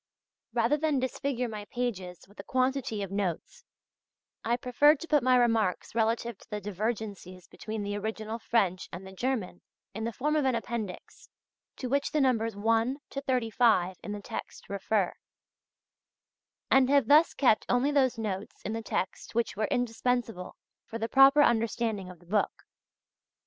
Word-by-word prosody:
Rather 295 Hz, -, +2 dB
than 305 Hz, -1 st, +1 dB
disfigure 260 Hz, -1 st, -2 dB
my 215 Hz, -2 st, -6 dB
pages 190 Hz, -9 st, -4 dB
with 205 Hz, -, -21 dB
a -, -, -6 dB
quantity 255 Hz, -5 st, 0 dB
of 195 Hz, -, -6 dB
notes, 195 Hz, -, -3 dB, 0.8 s
I 235 Hz, +1 st, +1 dB
preferred 270 Hz, +5 st, +4 dB
to 335 Hz, -, -6 dB
put 300 Hz, -3 st, +3 dB
my 255 Hz, +1 st, +4 dB
remarks 225 Hz, -6 st, +1 dB
relative 230 Hz, -1 st, 0 dB
to -, -, -19 dB
the 210 Hz, -, -3 dB
divergencies 205 Hz, -2 st, -4 dB
between 215 Hz, -1 st, -6 dB
the 205 Hz, 0 st, -3 dB
original 220 Hz, +2 st, -4 dB
French 190 Hz, -6 st, 0 dB
and 180 Hz, +2 st, -8 dB
the 190 Hz, -, -9 dB
German 210 Hz, -3 st, -3 dB, 0.3 s
in 220 Hz, +2 st, -5 dB
the 230 Hz, -, -1 dB
form 300 Hz, +6 st, -1 dB
of 300 Hz, -, +2 dB
an 260 Hz, -2 st, +2 dB
appendix 225 Hz, -4 st, -6 dB, 0.5 s
(to 255 Hz, -, -5 dB
which 280 Hz, +3 st, 0 dB
the 305 Hz, -, +2 dB
Numbers 230 Hz, -5 st, +1 dB
1 225 Hz, +5 st, +1 dB
to 275 Hz, -, -4 dB
35 225 Hz, -8 st, +2 dB
in 210 Hz, -, -5 dB
the 205 Hz, -1 st, -6 dB
text -, -, -7 dB
refer), 200 Hz, -1 st, 0 dB, 1.6 s
and 265 Hz, -1 st, +5 dB
have 280 Hz, -4 st, +4 dB
thus 305 Hz, +4 st, +5 dB
kept 245 Hz, -6 st, +3 dB
only 250 Hz, +4 st, +2 dB
those 260 Hz, -4 st, +2 dB
notes 205 Hz, -3 st, -4 dB
in 215 Hz, -, -3 dB
the 225 Hz, -, -3 dB
text 205 Hz, 0 st, -4 dB
which 235 Hz, -1 st, 0 dB
were 215 Hz, +1 st, 0 dB
indispensable 240 Hz, -4 st, -1 dB, 0.3 s
for 225 Hz, -, -7 dB
the 225 Hz, 0 st, -3 dB
proper 275 Hz, +2 st, +7 dB
understanding 225 Hz, -5 st, 0 dB
of 180 Hz, -, -11 dB
the 175 Hz, -, -21 dB
book. 205 Hz, +4 st, -1 dB
225 Hz, 165 wpm, -29 LUFS, 205-255 Hz, 1.6 s, proper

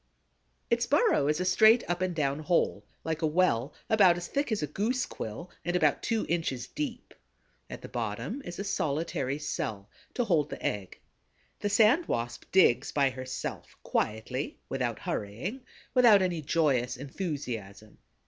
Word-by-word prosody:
Its -, -, +2 dB
burrow 140 Hz, -, +3 dB
is 150 Hz, +2 st, +1 dB
a 180 Hz, -, -1 dB
straight 220 Hz, +5 st, +5 dB
up 175 Hz, +1 st, -1 dB
and 185 Hz, -2 st, -1 dB
down 140 Hz, -2 st, 0 dB
hole, 160 Hz, +3 st, +1 dB, 0.2 s
like 160 Hz, 0 st, -2 dB
a 160 Hz, -, +2 dB
well, 150 Hz, -6 st, +2 dB, 0.2 s
about 190 Hz, -5 st, +5 dB
as 175 Hz, -, -5 dB
thick 280 Hz, +3 st, -2 dB
as 210 Hz, -7 st, 0 dB
a -, -, +2 dB
goose 215 Hz, -, -1 dB
quill 140 Hz, +12 st, -7 dB
and 175 Hz, +1 st, -1 dB
about 155 Hz, -5 st, +3 dB
two 225 Hz, -2 st, 0 dB
inches 160 Hz, -7 st, -1 dB
deep. 270 Hz, -6 st, -5 dB, 0.6 s
At -, -, -8 dB
the -, -, -6 dB
bottom 285 Hz, -, -4 dB
is 175 Hz, -, -7 dB
a 200 Hz, -, -3 dB
solitary 155 Hz, -7 st, -1 dB
cell, 110 Hz, -9 st, -4 dB, 0.2 s
to 245 Hz, -, +1 dB
hold 160 Hz, -9 st, +2 dB
the -, -, -7 dB
egg. 100 Hz, -3 st, -3 dB, 0.6 s
The 205 Hz, -, -1 dB
Sand 225 Hz, -, +4 dB
Wasp 115 Hz, 0 st, -3 dB
digs 185 Hz, -10 st, +4 dB
by 140 Hz, -2 st, +2 dB
herself, 130 Hz, 0 st, -6 dB
quietly, 110 Hz, +6 st, -2 dB
without 125 Hz, -4 st, -1 dB
hurrying, 110 Hz, -, -4 dB, 0.3 s
without 230 Hz, -6 st, +6 dB
any 175 Hz, -3 st, -1 dB
joyous 140 Hz, -6 st, +1 dB
enthusiasm. 125 Hz, -, -6 dB
155 Hz, 160 wpm, -29 LUFS, 130-190 Hz, 0.6 s, without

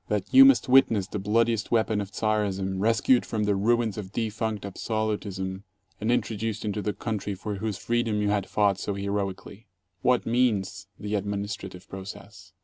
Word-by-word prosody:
That 105 Hz, -3 st, -2 dB
you 270 Hz, +1 st, +10 dB
must 275 Hz, -, +5 dB
witness 120 Hz, -6 st, +5 dB
the 105 Hz, -, -5 dB
bloodiest 110 Hz, +2 st, +1 dB
weapon 110 Hz, -2 st, +1 dB
of 100 Hz, 0 st, -7 dB
Czarism 100 Hz, -3 st, -1 dB
rescued 115 Hz, +4 st, +3 dB
from 110 Hz, -2 st, -2 dB
the 105 Hz, -1 st, +2 dB
ruins 110 Hz, +1 st, +1 dB
of 95 Hz, -2 st, -7 dB
defunct 110 Hz, -2 st, -2 dB
absolutism 100 Hz, -2 st, -3 dB, 0.4 s
and 110 Hz, +3 st, 0 dB
introduced 110 Hz, -2 st, -1 dB
into 105 Hz, 0 st, -2 dB
the 105 Hz, -, -1 dB
country 105 Hz, 0 st, -3 dB
for 105 Hz, +1 st, -5 dB
whose 105 Hz, -1 st, -3 dB
freedom 115 Hz, -2 st, 0 dB
you 105 Hz, 0 st, +1 dB
had 100 Hz, -2 st, 0 dB
fought 100 Hz, -2 st, +2 dB
so 100 Hz, -, -3 dB
heroically! 100 Hz, +1 st, -4 dB, 0.3 s
What 125 Hz, +4 st, +2 dB
means 110 Hz, -5 st, 0 dB
the 105 Hz, 0 st, -4 dB
administrative 100 Hz, -2 st, -4 dB
process? 95 Hz, 0 st, -10 dB
105 Hz, 160 wpm, -26 LUFS, 100-110 Hz, 0.4 s, you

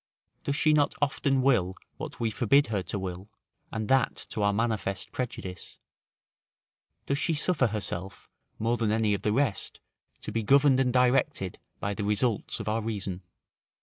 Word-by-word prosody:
Does 140 Hz, -, 0 dB
she 155 Hz, +1 st, +3 dB
not 145 Hz, -1 st, +3 dB
often 135 Hz, -2 st, +1 dB
will 100 Hz, -9 st, +3 dB, 0.2 s
what -, -, -7 dB
we 115 Hz, -1 st, 0 dB
forbid 140 Hz, +6 st, +4 dB
her 100 Hz, -, +1 dB
to 95 Hz, -, -4 dB
will, 95 Hz, +1 st, -5 dB, 0.4 s
and 110 Hz, -1 st, -3 dB
that 135 Hz, 0 st, +3 dB
to 105 Hz, -, -3 dB
our 100 Hz, 0 st, +3 dB
manifest 105 Hz, -3 st, -1 dB
prejudice? 95 Hz, -7 st, -5 dB, 1.3 s
Does 140 Hz, +1 st, 0 dB
she 165 Hz, -, +1 dB
suffer 150 Hz, -4 st, +2 dB
herself, 100 Hz, -3 st, -5 dB, 0.3 s
more 115 Hz, +2 st, 0 dB
than 110 Hz, -3 st, +1 dB
any 110 Hz, -1 st, +2 dB
of 100 Hz, -, -2 dB
the 105 Hz, -, +1 dB
rest, 125 Hz, -3 st, 0 dB, 0.4 s
to -, -, -5 dB
be 115 Hz, -, 0 dB
governed 135 Hz, +3 st, +5 dB
and 130 Hz, -1 st, +2 dB
directed 125 Hz, -, +2 dB, 0.2 s
by 100 Hz, -, -2 dB
the 105 Hz, -, -4 dB
results 105 Hz, +2 st, 0 dB
of -, -, -6 dB
our 110 Hz, +1 st, 0 dB
reason? 100 Hz, -4 st, -4 dB
115 Hz, 165 wpm, -28 LUFS, 100-135 Hz, 1.3 s, governed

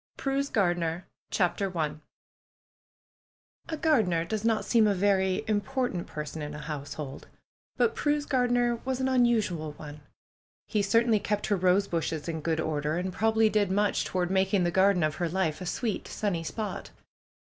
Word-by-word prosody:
PRUE'S 275 Hz, +1 st, -1 dB
GARDENER 175 Hz, -3 st, 0 dB, 0.2 s
CHAPTER 185 Hz, 0 st, 0 dB
I 155 Hz, -2 st, 0 dB, 1.8 s
A 320 Hz, -, -2 dB
GARDENER 215 Hz, -, +2 dB
does 215 Hz, +4 st, -3 dB
not 225 Hz, -1 st, +1 dB
seem 225 Hz, -3 st, +4 dB
a 205 Hz, -, +2 dB
very 190 Hz, -1 st, +2 dB
important 215 Hz, -2 st, -1 dB
person 150 Hz, +1 st, -6 dB
in 150 Hz, 0 st, -5 dB
a 150 Hz, -, -7 dB
household; 145 Hz, -2 st, -6 dB, 0.5 s
but 450 Hz, -, +3 dB
Prue's 295 Hz, 0 st, 0 dB
gardener 245 Hz, -3 st, +2 dB
was 260 Hz, 0 st, -2 dB
an 260 Hz, -, +1 dB
unusual 220 Hz, -, +1 dB
one. 150 Hz, 0 st, -10 dB, 0.7 s
He 210 Hz, -, +1 dB
certainly 225 Hz, +2 st, +3 dB
kept 205 Hz, 0 st, -1 dB
her 205 Hz, -, +1 dB
rose 185 Hz, +2 st, +3 dB
bushes 160 Hz, -2 st, -2 dB
in 160 Hz, -2 st, -3 dB
good 160 Hz, 0 st, 0 dB
order, 150 Hz, -1 st, -1 dB
and 180 Hz, +1 st, -3 dB
probably 220 Hz, +2 st, +3 dB
did 210 Hz, -2 st, +1 dB
much 205 Hz, +1 st, +1 dB
toward 180 Hz, -1 st, -1 dB
making 190 Hz, 0 st, +2 dB
the 175 Hz, -, +1 dB
garden 190 Hz, -1 st, +3 dB
of 155 Hz, 0 st, 0 dB
her 175 Hz, -1 st, -1 dB
life 170 Hz, -2 st, -1 dB
a 180 Hz, -, -4 dB
sweet, 225 Hz, +2 st, -2 dB
sunny 190 Hz, -6 st, -2 dB
spot. 205 Hz, +7 st, -5 dB
190 Hz, 160 wpm, -28 LUFS, 165-220 Hz, 1.8 s, seem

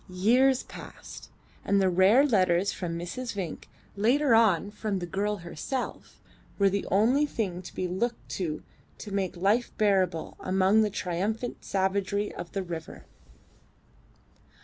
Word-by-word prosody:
Years 245 Hz, +8 st, +3 dB
passed, -, -, -11 dB, 0.3 s
and 200 Hz, -, +2 dB
the 190 Hz, -, +3 dB
rare 190 Hz, +9 st, +5 dB
letters 185 Hz, -6 st, +2 dB
from 170 Hz, -2 st, -4 dB
Mrs. 230 Hz, +9 st, -5 dB
Vinck, 185 Hz, -6 st, -5 dB, 0.3 s
later 245 Hz, +6 st, +3 dB
on 205 Hz, -4 st, +4 dB
from 210 Hz, -1 st, -3 dB
the 180 Hz, -, -3 dB
girl 200 Hz, +4 st, -1 dB
herself, 175 Hz, -, -5 dB, 0.4 s
were 200 Hz, -1 st, +4 dB
the 200 Hz, +1 st, -2 dB
only 245 Hz, +9 st, +3 dB
thing 190 Hz, -9 st, -3 dB
to 185 Hz, -, -11 dB
be 185 Hz, -, -1 dB
looked 215 Hz, +7 st, -2 dB
to 165 Hz, -5 st, -3 dB, 0.3 s
to 210 Hz, -, -8 dB
make 190 Hz, -3 st, -2 dB
life 205 Hz, +7 st, +2 dB
bearable 190 Hz, -6 st, +1 dB
amongst 190 Hz, +3 st, +3 dB
the 215 Hz, -, +2 dB
triumphant 205 Hz, +6 st, -3 dB
savagery 200 Hz, +1 st, -1 dB
of 170 Hz, -, -8 dB
the 195 Hz, -, -2 dB
river. 170 Hz, -2 st, -7 dB
200 Hz, 140 wpm, -28 LUFS, 185-220 Hz, 0.4 s, rare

